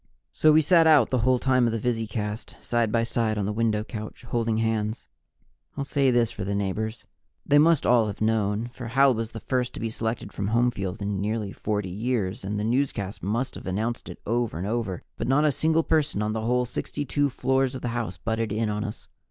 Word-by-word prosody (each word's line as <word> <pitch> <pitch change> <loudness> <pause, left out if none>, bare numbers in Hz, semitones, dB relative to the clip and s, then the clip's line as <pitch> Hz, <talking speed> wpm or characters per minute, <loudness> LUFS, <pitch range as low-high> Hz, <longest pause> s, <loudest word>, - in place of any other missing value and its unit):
So 155 - +5
we 155 +1 +5
sat 165 0 +5
out 150 -7 +6
the 130 - +1
whole 130 +2 +3
time 130 -1 +3
of - - 0
the - - 0
visicast, 110 -2 -3
side 120 -2 0
by 115 0 +2
side 115 -2 0
on 100 - 0
the 105 - -1
window 110 -1 +1
couch, 110 +1 -8
holding 115 -2 -1
hands. 110 0 -1 0.7
I'll 140 - -1
say 140 -1 +2
this 120 -2 +2
for 105 - -5
the 100 +2 -2
neighbors 110 +3 -2 0.4
they 145 - +5
must 160 0 +4
all 120 -3 +4
have 105 - -5
known, 110 +1 0
for 120 -2 -7
Hal 135 +3 +4
was 115 0 -3
the 115 - -7
first 125 +1 -1
to - - -6
be 115 -1 -2
selected 110 +1 -3
from 100 - -2
Homefield 110 -4 0
in 100 -1 -2
nearly 105 -1 -2
40 105 -2 -2
years, 105 +1 -2
and 105 +2 -2
the - - -2
newscast 115 -4 -1
must 120 +6 -1
have - - -9
announced 110 +6 -2
it - - -9
over 115 -3 -1
and 90 - -3
over, 110 -4 -2
but - - -3
not 140 +4 +3
a 150 - +4
single 160 +3 +2
person 155 -10 +1
on 105 0 -1
the 110 - -2
whole 125 +2 +1
62 145 +3 -1
floors 130 0 0
of 130 - -7
the 120 - -1
house 115 -7 -3
butted 110 +3 -2
in 110 +1 0
on 105 0 -2
us. 105 - -7
115 Hz, 220 wpm, -26 LUFS, 105-125 Hz, 0.7 s, out